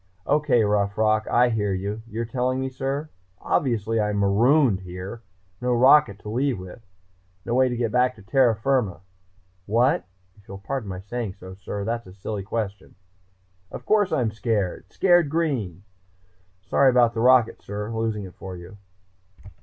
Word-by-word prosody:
"Okay, 145 Hz, -5 st, +2 dB
Rough 100 Hz, -1 st, 0 dB
Rock, 110 Hz, 0 st, +2 dB
I 120 Hz, +1 st, +4 dB
hear 105 Hz, -4 st, 0 dB
you.... 100 Hz, +4 st, -4 dB
You're 115 Hz, +1 st, -4 dB
telling 130 Hz, +2 st, -1 dB
me, 130 Hz, 0 st, -2 dB
sir?... 135 Hz, +4 st, -4 dB, 0.3 s
Obviously, 115 Hz, -4 st, 0 dB
I'm 105 Hz, 0 st, -1 dB
marooned 110 Hz, +3 st, +3 dB
here. 95 Hz, +4 st, -8 dB, 0.4 s
No 125 Hz, 0 st, +1 dB
rocket 130 Hz, -3 st, +5 dB
to 105 Hz, -, -8 dB
leave 130 Hz, +2 st, 0 dB
with. 95 Hz, +4 st, -10 dB, 0.6 s
No 120 Hz, -, -2 dB
way 130 Hz, +1 st, +3 dB
to 120 Hz, -, -3 dB
get 115 Hz, -2 st, -1 dB
back 125 Hz, +1 st, +2 dB
to 105 Hz, -, -16 dB
terra 120 Hz, +2 st, +3 dB
firma... 110 Hz, -6 st, 0 dB, 0.7 s
what? 125 Hz, -, +2 dB, 0.3 s
If 100 Hz, -, -24 dB
you'll 100 Hz, -, -8 dB
pardon 110 Hz, +2 st, -5 dB
my 90 Hz, -1 st, -6 dB
saying 105 Hz, -1 st, -5 dB
so, 95 Hz, -1 st, -11 dB
sir, 100 Hz, +1 st, -6 dB
that's 115 Hz, -1 st, -3 dB
a 90 Hz, -, -12 dB
silly 100 Hz, +1 st, -5 dB
question.... 100 Hz, -1 st, -5 dB, 0.7 s
Of -, -, -9 dB
course 205 Hz, -3 st, +2 dB
I'm 120 Hz, -5 st, +1 dB
scared! 105 Hz, -4 st, -2 dB
Scared 175 Hz, -5 st, +3 dB
green. 130 Hz, -, -2 dB, 0.8 s
Sorry 135 Hz, +6 st, +4 dB
about 120 Hz, -2 st, +4 dB
the 115 Hz, -, -4 dB
rocket, 125 Hz, -1 st, +4 dB
sir, 105 Hz, +2 st, -5 dB
losing 110 Hz, -2 st, -2 dB
it 95 Hz, -2 st, -10 dB
for 95 Hz, -1 st, -8 dB
you.... 90 Hz, +4 st, -12 dB
115 Hz, 165 wpm, -24 LUFS, 100-125 Hz, 0.8 s, rocket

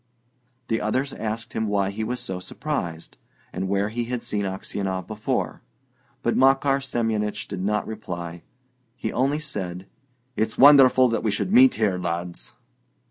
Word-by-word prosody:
The 115 Hz, -, 0 dB
others 130 Hz, +6 st, -1 dB
asked 110 Hz, +1 st, -4 dB
him 110 Hz, 0 st, -1 dB
why 100 Hz, -1 st, +1 dB
he 110 Hz, +2 st, -4 dB
was 125 Hz, +3 st, -3 dB
so 95 Hz, -4 st, -4 dB
surprised, 90 Hz, -, -5 dB, 0.4 s
and 95 Hz, +1 st, -3 dB
where 100 Hz, +1 st, +1 dB
he 120 Hz, +2 st, -2 dB
had 125 Hz, 0 st, -4 dB
seen 100 Hz, -1 st, -2 dB
Aksionov 95 Hz, 0 st, -3 dB
before; 110 Hz, -1 st, -2 dB, 0.6 s
but -, -, +1 dB
Makar 135 Hz, +1 st, +4 dB
Semyonich 110 Hz, -5 st, -1 dB
did 90 Hz, -, -5 dB
not 105 Hz, +1 st, 0 dB
reply. 85 Hz, -6 st, -6 dB, 0.5 s
He 125 Hz, -, -4 dB
only 135 Hz, +4 st, +1 dB
said: 95 Hz, -12 st, -5 dB, 0.5 s
"It's 110 Hz, 0 st, -1 dB
wonderful 130 Hz, -2 st, +8 dB
that 115 Hz, -, 0 dB
we 110 Hz, -, 0 dB
should 105 Hz, -, -1 dB
meet 255 Hz, +2 st, +7 dB
here, 100 Hz, -5 st, +1 dB
lads!" 85 Hz, 0 st, -4 dB
110 Hz, 150 wpm, -24 LUFS, 95-125 Hz, 0.6 s, wonderful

